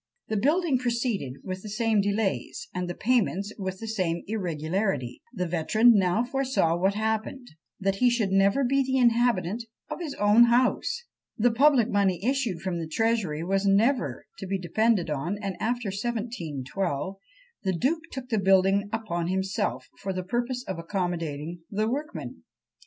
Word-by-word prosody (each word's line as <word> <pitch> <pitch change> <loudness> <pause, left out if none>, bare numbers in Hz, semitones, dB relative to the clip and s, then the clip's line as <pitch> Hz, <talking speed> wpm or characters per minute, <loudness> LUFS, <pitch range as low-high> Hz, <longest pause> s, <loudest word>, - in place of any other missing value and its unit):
The 220 - 0
building 295 - +2
proceeded 235 - -1
with 185 0 -5
the 210 - -8
same 220 0 +2
delays, 205 - -1
and 180 -1 -3
the 175 - -4
payments 210 -4 +1
with 190 -1 -3
the 225 - -6
same 180 -6 -1
irregularity; 175 - -2
the 180 -7 -2
veteran 180 +8 +4
now 195 +2 +2
foresaw 255 -9 +1
what 190 +3 +1
happened, 220 +4 -2 0.3
that 195 -1 0
he 250 +2 +4
should 230 -5 0
never 195 +7 +3
be 275 +2 +2
the 265 0 0
inhabitant 235 -4 +2 0.3
of - - -4
his 310 -5 -4
own 210 +3 +6
house! 255 - +1 0.3
The 240 +2 +3
public 260 -1 +4
money 195 -5 +1
issued 245 -10 0
from 185 -3 -2
the 165 - -4
Treasury 190 -4 0
was 195 +2 0
never 225 +7 +2
to 195 - -6
be 195 +1 0
depended 190 -1 +1
on; 155 +8 -2
and 200 -2 -3
after 240 -1 -1
1712, 195 - -3 0.4
the 190 -3 -1
duke 315 - +1
took 260 -1 -7
the 220 -3 +1
building 195 +1 +3
upon 185 -7 -2
himself, 190 +3 -1
for 195 -1 -3
the 185 0 -3
purpose 240 +5 -2
of 190 -3 -4
accommodating 165 -3 -3
the 215 +2 0
workmen. 295 +7 -4
205 Hz, 160 wpm, -27 LUFS, 185-240 Hz, 0.4 s, own